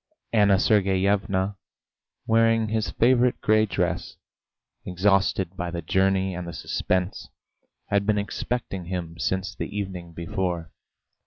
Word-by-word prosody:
Anna 100 -3 +5
Sergeyevna, 100 -1 +1 0.7
wearing 115 -1 +3
his 110 0 -1
favourite 125 +1 +3
grey 110 0 +3
dress, 90 - -2 0.7
exhausted 95 0 +1
by 90 -1 -3
the 85 -1 -5
journey 95 +2 +1
and 90 0 -5
the 85 - -6
suspense, 90 +3 -2 0.6
had 100 0 +1
been 105 -1 +3
expecting 100 -2 -3
him 85 -2 -5
since 95 0 -1
the - - -5
evening 90 -4 -5
before. 85 -1 -3
95 Hz, 115 wpm, -25 LUFS, 90-105 Hz, 0.7 s, Anna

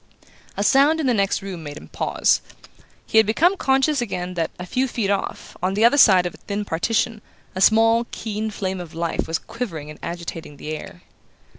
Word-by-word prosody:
A 200 - 0
sound 280 +7 +4
in 310 - -1
the 255 - +3
next 200 -1 0
room 190 -4 -6
made 145 -1 -8
him - - -11
pause. - - +1 0.6
He 220 - +4
had 220 - +4
become 335 - +3
conscious 270 -3 +2
again 180 -5 -3
that, 165 -2 -1
a 180 - -6
few 255 +8 0
feet 225 -5 -1
off, 200 - -3
on 185 +2 0
the 215 +3 +4
other 240 - +5
side 190 -8 +7
of 175 - -3
a - - -14
thin 205 0 -4
partition, 215 +5 0 0.3
a 185 - -4
small 225 +2 +4
keen 220 0 -4
flame 190 -3 -3
of 165 -2 -10
life 170 0 -2
was 165 0 0
quivering 165 -12 -6
and 150 - -13
agitating 170 -3 -6
the 155 +1 -5
air. 85 - -10
200 Hz, 200 wpm, -22 LUFS, 175-230 Hz, 0.6 s, side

